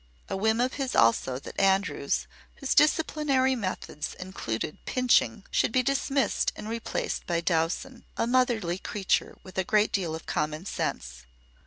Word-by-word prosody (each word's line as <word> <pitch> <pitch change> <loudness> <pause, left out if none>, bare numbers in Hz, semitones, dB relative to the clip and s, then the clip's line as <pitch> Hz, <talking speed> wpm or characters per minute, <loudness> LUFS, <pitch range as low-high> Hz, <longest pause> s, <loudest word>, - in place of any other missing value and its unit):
A - - -2
whim 220 +3 +1
of 255 +2 +1
his 265 -2 -2
also 115 +3 +3
that 135 - -7
Andrews, 195 0 +1 0.3
whose 275 - -1
disciplinary 295 -3 +3
methods 185 -8 -4
included 155 -7 -5
pinching, 250 -4 +2
should - - +2
be 255 +2 +2
dismissed 275 -1 +1
and 210 - -7
replaced 230 +1 -3
by 170 -2 +1
Dowson, 170 +10 -1
a - - +1
motherly 235 -8 +1
creature 195 -1 -1
with 185 0 -6
a - - +2
great 210 +3 +2
deal 170 -5 -1
of 160 - -9
common 155 +3 -2
sense. - - -4
205 Hz, 150 wpm, -28 LUFS, 170-255 Hz, 0.3 s, also